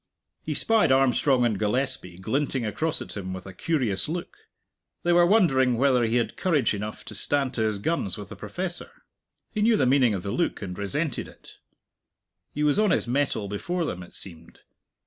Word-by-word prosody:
He - - -3
spied 225 -10 +3
Armstrong 130 -1 +3
and 110 -5 0
Gillespie 110 -5 -1
glinting 130 +5 -1
across 150 +10 -2
at - - -10
him 95 -2 -5
with 95 -1 -7
a 95 - -9
curious 120 - -1
look: 170 +2 -4 0.7
they 175 - +3
were 175 0 +6
wondering 135 - +4
whether 125 -2 +3
he 115 +1 0
had 115 -3 0
courage 160 -11 +2
enough 105 +1 -5
to - - -8
stand 135 +5 0
to 115 - -2
his 110 -2 +1
guns 100 - -1
with 105 -1 -9
a - - -6
professor. 180 -1 -5 0.6
He 210 - -2
knew 225 +1 +4
the 135 - +3
meaning 125 -4 +4
of 90 - -5
the 100 - -3
look, 175 - -1
and 90 -3 -6
resented 130 - -2
it. - - -16 0.9
He 150 - -2
was 150 +5 +3
on 215 -1 +4
his - - +2
mettle 130 -5 0
before 170 - -2
them, 90 - -4
it 90 - -12
seemed. 85 -3 -11
130 Hz, 190 wpm, -26 LUFS, 105-155 Hz, 0.9 s, were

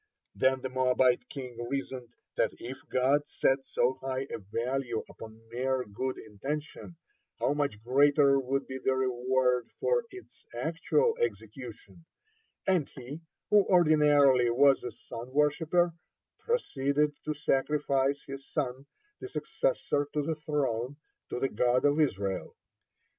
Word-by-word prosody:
Then 130 0 +2
the 130 - -3
Moabite 130 -1 +2
king 125 -4 -7
reasoned, 135 -3 -4 0.3
that - - +1
if 130 +3 -7
God 130 +3 +3
set 135 -1 +2
so 130 +2 +1
high 135 0 -2
a - - -4
value 120 +3 -2
upon 115 0 -12
mere 130 +1 0
good 130 +5 -4
intention, 145 - -6 0.4
how - - +1
much 140 -8 -2
greater 140 +2 +4
would 135 +1 -1
be 130 0 -6
the 130 - +2
reward 125 -1 +1
for 480 0 +1
its 375 -4 -14
actual 165 - +1
execution, 125 - -5 0.6
and 185 -7 +2
he, 135 +5 -9 0.3
who 210 -1 +7
ordinarily 150 -7 +5
was 135 +3 +4
a 125 - -3
sun 120 +1 -9
worshipper, 160 +4 +2 0.5
proceeded 150 - 0
to 155 0 -2
sacrifice 140 -1 +1
his 135 0 -7
son, 135 -1 -2 0.3
the 390 - -6
successor 390 - -1
to 150 - 0
the 160 +3 -1
throne, 145 -5 -2 0.3
to - - -3
the 135 - +1
God 125 +4 +2
of 145 +2 +3
Israel. 100 -10 -1
135 Hz, 130 wpm, -30 LUFS, 125-150 Hz, 0.6 s, who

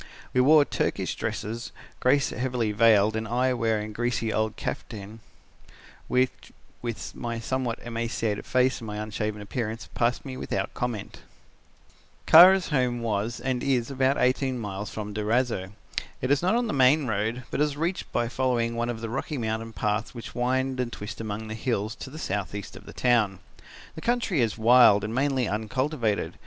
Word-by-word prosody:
We 125 - +4
wore 150 +2 +6
Turkish - - -1
dresses, 115 +3 -4 0.3
Grace 140 +2 +3
heavily 120 -3 -1
veiled 110 -1 +4
and 110 0 -2
I 125 +3 +1
wearing 110 -3 -1
a - - -11
greasy 115 -1 -1
old 110 0 0
kaftan 105 0 -6 0.9
which, 125 0 0 0.3
with 120 -2 -5
my 120 -1 -4
somewhat 120 0 -2
emaciated 115 -2 -2
face 130 0 +2
and 115 - -8
my 105 0 -5
unshaven 105 0 -3
appearance, 115 +1 -4
passed 120 +3 0
me 130 -2 -6
without 95 -5 -3
comment. 120 -5 -4 1.1
"Kara's 180 +3 +8
home 125 -5 +1
was 110 +1 -1
and 130 -2 -1
is 130 -2 0
about 135 +1 +2
eighteen 130 0 +1
miles 105 -2 -5
from 105 -1 -6
Durazzo. 105 -2 0 0.5
It 130 - -1
is 145 - +3
not 185 +6 +2
on 240 0 +1
the 215 - -2
main 135 +2 +4
road, 110 +2 -1
but - - -1
it - - +6
is 145 -1 -1
reached 170 +4 -2
by 120 - 0
following 120 -2 0
one 120 +1 -1
of 115 -2 -4
the 115 - -3
rocky 135 +5 -3
mountain 110 -1 -3
paths 105 +2 -2
which 110 -3 -8
wind 130 +1 0
and 125 -2 -1
twist 105 +1 -7
among 110 0 -4
the 110 - -5
hills 110 -2 -2
to - - -7
the 150 - -10
south 100 -10 -3
east 100 - -7
of - - -13
the - - -8
town. 115 -6 +2 0.6
The 160 - -9
country 235 - +1
is 115 -2 0
wild 115 -3 +6
and 110 +1 -3
mainly 135 -2 +1
uncultivated. 110 +2 -1
120 Hz, 175 wpm, -26 LUFS, 110-130 Hz, 1.1 s, Kara's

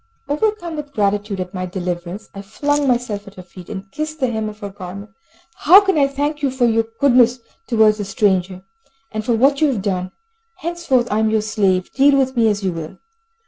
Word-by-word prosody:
Overcome 340 +2 -1
with 290 -1 -7
gratitude 205 -2 0
at 180 +1 -5
my 185 -1 -3
deliverance, 180 +2 -5
I 195 - -7
flung 290 +8 -1
myself 240 -5 -1
at 200 - -12
her 185 - -10
feet, 180 -1 -13
and 195 -2 -7
kissed 310 +5 -5
the 260 -3 0
hem 220 -1 -2
of 210 - -11
her 200 - -5
garment. 195 +2 -9 0.5
"How 360 +6 +8
can 390 -1 +1
I 285 -2 +4
thank 290 +2 -2
you 280 - +1
for 255 -1 +1
your 225 -1 +2
goodness 250 -2 +4 0.3
towards 220 -2 +3
a 205 - -3
stranger, 185 -2 0 0.5
and 215 0 -3
for 235 - 0
what 275 +5 +3
you 310 - +5
have 235 -9 -1
done? 185 -2 -2 0.5
Henceforth 325 -8 0
I 210 - +1
am 220 0 +2
your 220 0 +1
slave. 195 -4 0
Deal 275 +1 +4
with 265 -1 +1
me 230 -2 +3
as 205 -1 0
you 185 -2 0
will!" 160 -2 -7
220 Hz, 210 wpm, -19 LUFS, 195-275 Hz, 0.5 s, How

